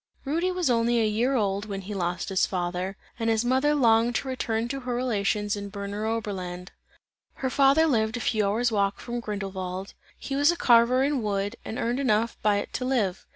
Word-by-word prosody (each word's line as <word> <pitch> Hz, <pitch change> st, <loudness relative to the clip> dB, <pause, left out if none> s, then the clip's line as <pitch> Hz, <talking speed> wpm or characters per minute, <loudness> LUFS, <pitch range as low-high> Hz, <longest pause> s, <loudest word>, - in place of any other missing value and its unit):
Rudy 335 Hz, +6 st, 0 dB
was 360 Hz, -2 st, -1 dB
only 235 Hz, -1 st, +2 dB
a 225 Hz, -, +2 dB
year 230 Hz, +6 st, +1 dB
old, 200 Hz, -3 st, 0 dB
when 200 Hz, -2 st, -5 dB
he 200 Hz, +2 st, -7 dB
lost 180 Hz, -1 st, -2 dB
his 190 Hz, -1 st, +2 dB
father, 180 Hz, +1 st, -3 dB, 0.2 s
and 225 Hz, 0 st, 0 dB
his 225 Hz, +1 st, +1 dB
mother 265 Hz, +4 st, +2 dB
longed 235 Hz, -2 st, +3 dB
to -, -, -1 dB
return 230 Hz, -3 st, -1 dB
to 275 Hz, +1 st, -3 dB
her 245 Hz, -2 st, -3 dB
relations 210 Hz, -4 st, 0 dB
in 200 Hz, 0 st, -6 dB
Berner 200 Hz, +2 st, -5 dB
Oberlande. 185 Hz, -5 st, -4 dB, 0.7 s
Her 260 Hz, -1 st, -3 dB
father 275 Hz, +4 st, +5 dB
lived 225 Hz, -5 st, +1 dB
a -, -, -4 dB
few 215 Hz, -3 st, +1 dB
hours 230 Hz, +4 st, +1 dB
walk 200 Hz, -2 st, 0 dB
from 240 Hz, 0 st, -4 dB
Grindelwald; 195 Hz, -3 st, -5 dB, 0.2 s
he 275 Hz, -, -5 dB
was 290 Hz, +4 st, +4 dB
a 345 Hz, -, -4 dB
carver 240 Hz, +1 st, +5 dB
in 280 Hz, -2 st, 0 dB
wood, 205 Hz, 0 st, -2 dB
and 225 Hz, -, -6 dB
earned 240 Hz, +2 st, -1 dB
enough 230 Hz, -3 st, +1 dB
by 210 Hz, -1 st, +3 dB
it 205 Hz, -, -4 dB
to -, -, -2 dB
live. 215 Hz, -8 st, -1 dB
225 Hz, 200 wpm, -26 LUFS, 200-250 Hz, 0.7 s, father